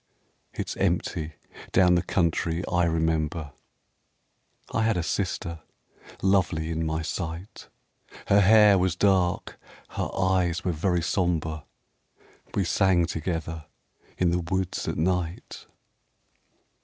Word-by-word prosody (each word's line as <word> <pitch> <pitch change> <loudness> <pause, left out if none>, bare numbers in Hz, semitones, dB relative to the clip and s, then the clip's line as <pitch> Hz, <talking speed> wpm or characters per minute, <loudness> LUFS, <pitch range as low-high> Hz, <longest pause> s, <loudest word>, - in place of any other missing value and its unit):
It's - - -5
empty 80 -1 -1 0.4
down 90 -1 +5
the 90 - +3
country 85 -1 0
I 90 -1 +2
remember. 80 -1 -1 1.2
I 115 - +1
had 110 -3 +2
a 85 - -1
sister 85 -1 -2 0.6
lovely 90 -4 +1
in 80 0 -1
my 80 +1 -2
sight: 85 +3 -6 0.6
Her 100 +1 +5
hair 105 -1 +6
was 90 -2 +1
dark, 95 -2 +1 0.3
her - - -3
eyes 95 -2 +1
were 90 - +2
very 85 +1 0
sombre; 80 -4 -1 0.9
We 100 - +2
sang 90 -1 +3
together 80 -1 -4 0.5
in 90 -2 +2
the 90 - +1
woods 90 +1 -2
at - - -2
night. 90 +1 -2
85 Hz, 115 wpm, -26 LUFS, 80-95 Hz, 1.2 s, hair